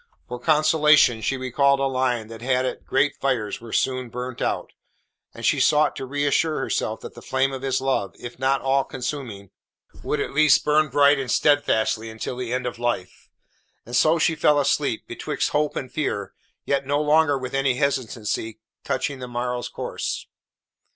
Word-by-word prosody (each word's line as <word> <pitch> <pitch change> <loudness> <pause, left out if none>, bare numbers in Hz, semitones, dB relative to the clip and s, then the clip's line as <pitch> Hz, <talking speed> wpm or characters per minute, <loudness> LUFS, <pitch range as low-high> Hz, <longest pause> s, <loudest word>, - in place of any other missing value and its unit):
For 125 0 -6
consolation 150 -4 +4
she 135 +5 -1
recalled 140 +2 +2
a - - 0
line 130 -4 0
that 115 0 -10
had 130 +1 +1
it - - -5
great 140 +2 +2
fires 125 -7 -1
were 115 -1 -10
soon 130 0 0
burnt 125 +1 -6
out, - - -2 0.6
and - - -7
she - - +3
sought 150 0 +3
to 130 - -5
reassure 145 +3 +1
herself - - -2
that - - -9
the - - -12
flame 130 +1 0
of 130 - -5
his 135 -1 0
love, 130 -7 -1
if 120 0 -9
not 135 +1 +1
all 135 0 +2
consuming, 125 -8 -6 0.5
would 150 - -2
at - - -3
least 155 -1 +4
burn 150 0 +3
bright 140 +1 +4
and 130 -2 -4
steadfastly 115 -6 +2
until 110 +3 -5
the 125 -1 -5
end 125 0 -1
of 120 -1 -4
life. 120 -6 -3 0.6
And 120 - -5
so 155 +6 +4
she 165 +1 +2
fell 150 -1 +3
asleep, 140 - 0
betwixt - - -3
hope 150 0 0
and 130 - -5
fear, 100 -10 -3 0.3
yet 140 -1 0
no 145 +1 +1
longer 150 -1 +3
with 130 -1 -6
any 135 -2 +1
hesitancy 115 -5 -2 0.2
touching 135 +1 -2
the 125 - -6
morrow's 120 0 -3
course. - - -4
130 Hz, 180 wpm, -23 LUFS, 120-145 Hz, 0.6 s, consolation